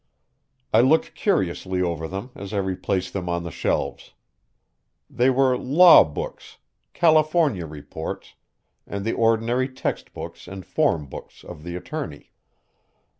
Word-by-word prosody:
I - - +7
looked 145 +6 +3
curiously 95 - -1
over 85 -3 -1
them 100 +8 -6
as 100 +1 -8
I - - -1
replaced 95 -1 -2
them 90 -3 -3
on 85 0 -1
the 85 - -6
shelves. - - -2 1.0
They 125 +2 +3
were 130 -1 +3
law 160 +8 +7
books, 75 - -7 0.4
California 155 - +3
Reports, 75 -1 -7 0.5
and 100 0 -5
the 115 - 0
ordinary 115 +3 +1
text 130 - -4
books - - -9
and 95 -1 -8
form 75 -3 +1
books 65 - -11
of - - -10
the 85 +2 -6
attorney. 90 - -6
100 Hz, 130 wpm, -23 LUFS, 90-130 Hz, 1.0 s, I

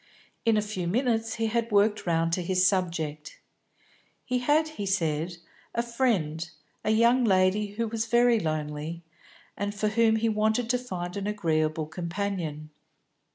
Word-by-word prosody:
In 225 -1 +4
a 210 - +1
few 190 -5 -4
minutes 225 +2 0
he 225 - -1
had 230 +1 -1
worked 205 -1 +2
round 165 0 +1
to 180 - +1
his 185 +1 +2
subject. 165 -5 -1 0.9
He 250 -1 0
had, 300 +5 +2
he 210 -10 -5
said, 165 -2 -1 0.4
a 235 - +1
friend, 195 - 0 0.3
a - - -1
young 235 +3 +4
lady 200 0 +2
who 230 +2 -1
was 225 +1 -2
very 240 0 +4
lonely, 155 0 -3 0.5
and 205 +1 -3
for 210 +1 0
whom 220 0 +3
he 225 +1 +1
wanted 220 +2 +1
to 250 - +1
find 180 -8 -5
an 200 0 -3
agreeable 155 -6 0
companion. 170 -2 -4
205 Hz, 155 wpm, -27 LUFS, 170-225 Hz, 0.9 s, In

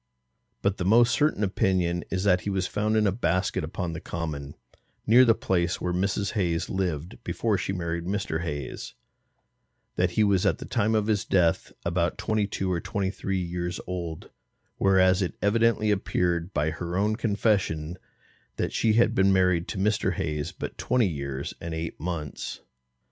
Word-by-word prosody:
But 100 0 +1
the - - -2
most 115 +5 +5
certain 145 -6 +2
opinion 90 -3 +1
is 95 0 -1
that 90 -2 +3
he - - -3
was 95 -2 0
found 105 +3 0
in 110 - +3
a 100 - +3
basket 90 -3 0
upon 85 -2 -4
the 80 - -5
common, 75 -4 -5 0.5
near 120 +4 +7
the 115 -2 +5
place 90 -3 0
where 90 - -2
Mrs. 100 +2 0
Hayes 85 -6 -1
lived 90 0 -2
before 110 -3 0
she 95 - -2
married 85 -2 -3
Mr. 95 -4 -2
Hayes, 75 -6 -5 1.0
that - - +3
he 110 - +5
was 100 -3 +3
at - - +2
that - - -10
time 110 0 +2
of 105 -1 +2
his 105 -2 +1
death 85 -6 +1
about 85 0 0
twenty 110 -2 0
two 95 -2 -2
or 85 -2 0
twenty 95 +2 -2
three 95 -1 -2
years 90 0 -3
old; 85 -3 -5 0.5
whereas 95 0 +4
it 90 - -2
evidently 110 0 +2
appeared 90 -3 0
by 75 -2 0
her 85 +2 -4
own 105 +2 +2
confession, 100 -7 0 0.6
that - - -2
she 110 - +2
had 115 0 +4
been 95 -3 +4
married 90 -2 +3
to - - -5
Mr. 100 0 +1
Hayes 75 0 -2
but - - -7
twenty 125 -4 +2
years 70 -4 -4
and 85 -1 -4
eight 80 0 -5
months. 80 -3 -5
95 Hz, 175 wpm, -26 LUFS, 85-105 Hz, 1.0 s, near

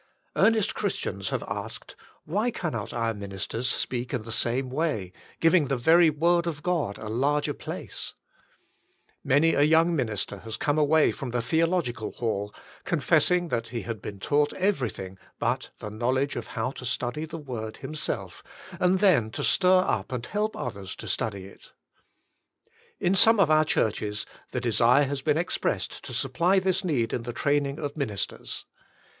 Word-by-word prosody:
Earnest 220 -2 +3
Christians - - -2
have - - -2
asked: - - -6 0.3
"Why 220 +4 0
cannot 140 - -3
our 115 -1 -1
minis 100 -2 -5
ters 120 +2 -2
speak 125 +1 -1
in 120 - -3
the 115 - -7
same 125 +3 0
way, 130 - -1 0.3
giving 165 -2 +4
the 135 - 0
very 160 +6 +6
word 170 +3 +2
of 150 -3 -4
God 165 - 0
a 110 - -7
larger 140 +7 +1
place? - - -5 0.5
'' - - -40
Many 160 +4 +5
a - - +2
young 165 +3 +4
minister 105 -6 -2
has 110 +2 -5
come 145 +1 +1
away 155 +1 +4
from 135 - -6
the 120 0 -1
Theological 160 -3 0
Hall, 105 -3 -2 0.3
confess - - +3
ing 180 -1 +1
that 115 -3 -1
he 115 0 -4
had 115 -4 -5
been 100 -2 -7
taught 145 +7 +1
everything 125 - -1 0.2
but - - -1
the 105 - -7
knowledge 130 +5 0
of - - -4
how 115 +3 0
to 135 - -9
study 125 +5 -2
the 160 - -7
Word 120 -7 -6
himself, 155 0 -5 0.4
and 185 +1 +3
then 165 - +4
to - - -4
stir 185 -1 +4
up 100 +1 -1
and 125 -2 -3
help 210 +1 -1
others 100 -6 -5
to - - -9
study 100 -4 -2
it. 100 - -15 1.3
In 175 - +2
some 220 +3 +6
of 165 -6 +4
our 155 0 +6
Churches, 105 -6 0 0.3
the 125 - -1
desire 120 +3 +4
has 140 0 -3
been 150 +2 +2
ex 170 +1 -1
pressed 95 -3 -2
to 135 - -7
supply 135 - +1
this 190 0 +1
need 135 -10 0
in - - -1
the 120 - -5
training 140 +1 +1
of 145 -3 -4
ministers. 110 -10 -3
135 Hz, 175 wpm, -27 LUFS, 115-165 Hz, 1.3 s, very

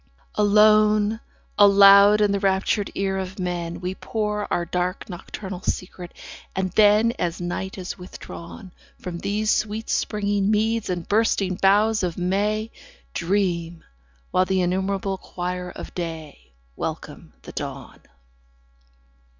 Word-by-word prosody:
Alone, 210 +1 +4 0.4
aloud 200 +1 +7
in 205 -1 +3
the 200 - 0
raptured 195 +1 +1
ear 195 -1 -1
of 190 0 -6
men 175 -2 -3
We 180 +1 -3
pour 210 0 -3
our 175 - 0
dark 180 +1 -2
nocturnal 185 +1 -7
secret; 180 -1 -4 0.4
and 190 -1 -1
then, 210 +3 +5
As 175 -1 -2
night 180 +2 -4
is 185 0 -6
withdrawn 180 +1 -10 0.3
15 - - -27
From 175 -2 -5
these 210 +3 0
sweet 215 +1 -3
springing 205 -2 0
meads 220 0 +1
and 175 -2 -3
bursting 205 -3 +1
boughs 205 +3 +3
of 175 -3 -2
May, 205 +5 -1 0.4
Dream, 170 -2 -1 0.5
while 185 0 +3
the 190 -1 +1
innumerable 190 +1 -1
choir 180 0 -5
of - - -9
day 160 - -7 0.2
Welcome - - -6
the - - -9
dawn. - - -7
195 Hz, 125 wpm, -23 LUFS, 180-210 Hz, 0.5 s, aloud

